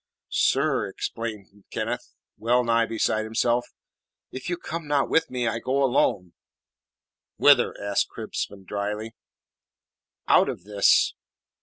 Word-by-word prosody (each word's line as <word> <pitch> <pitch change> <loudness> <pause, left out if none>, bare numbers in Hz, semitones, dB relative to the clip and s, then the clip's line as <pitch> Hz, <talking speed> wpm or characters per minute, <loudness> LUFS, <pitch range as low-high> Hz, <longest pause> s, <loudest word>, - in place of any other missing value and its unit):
"Sir," - - +2
exclaimed 105 -3 -6
Kenneth, - - -4 0.2
well 120 +2 +2
nigh 115 -1 +2
beside 110 -1 0
himself, 120 +2 0 0.6
"if 130 +6 -6
you 175 - -1
come 165 -2 -6
not 145 -2 +1
with 160 0 +2
me, 125 -2 -2
I 115 +1 -1
go 135 +3 0
alone!" 100 -9 +1 1.0
"Whither?" - - +5
asked 100 0 0
Crispin 95 -1 -6
dryly. 105 +3 -4 1.1
"Out - - +5
of - - -6
this." 100 0 +3
115 Hz, 120 wpm, -25 LUFS, 105-130 Hz, 1.1 s, Whither